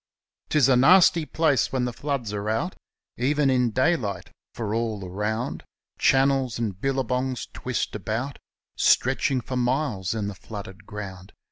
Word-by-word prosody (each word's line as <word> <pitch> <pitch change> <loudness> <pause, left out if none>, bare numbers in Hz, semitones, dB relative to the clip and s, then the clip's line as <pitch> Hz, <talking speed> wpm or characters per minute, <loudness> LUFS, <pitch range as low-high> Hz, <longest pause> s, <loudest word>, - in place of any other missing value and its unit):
220 155 - +2
Tis 135 - +5
a 130 - +5
nasty 170 +4 +6
place 150 -6 +2
when 130 -2 0
the 125 - -3
floods 125 -5 -3
are 105 +1 -3
out, 140 +12 -1 0.4
Even 140 +2 +2
in 125 -2 +2
daylight; 115 - 0 0.2
for 110 -3 -4
all 110 -4 -2
around 105 +6 -3 0.4
Channels 135 -2 +3
and 105 -5 -3
billabongs 130 -1 -1
twist 130 -1 -3
about, 110 +7 -3 0.4
Stretching 130 0 +2
for 130 +2 -4
miles 120 -6 0
in 105 -2 -2
the 100 - -4
flooded 100 +1 -9
ground. 95 -2 -8
125 Hz, 145 wpm, -25 LUFS, 105-135 Hz, 0.4 s, nasty